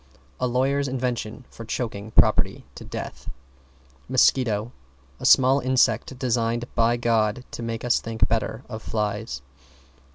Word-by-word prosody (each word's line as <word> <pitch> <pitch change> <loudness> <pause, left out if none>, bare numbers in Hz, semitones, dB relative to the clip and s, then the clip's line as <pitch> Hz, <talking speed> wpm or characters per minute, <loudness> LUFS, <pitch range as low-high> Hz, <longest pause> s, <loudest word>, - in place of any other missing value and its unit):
A 125 - +1
lawyer's 135 +3 +1
invention 125 -2 -3
for 115 - -9
choking 110 -2 -4
property - - +3
to - - -10
death. - - -7 0.8
=MOSQUITO= 120 -4 +2 0.5
A - - -6
small 130 +1 +6
insect 130 -1 +1
designed 120 -2 0
by 120 0 +2
God 115 0 +1
to - - -6
make 115 0 -4
us 120 - +3
think 115 -1 0
better 110 +1 -1
of 110 -2 -7
flies. 105 - -3
120 Hz, 130 wpm, -24 LUFS, 110-125 Hz, 0.8 s, small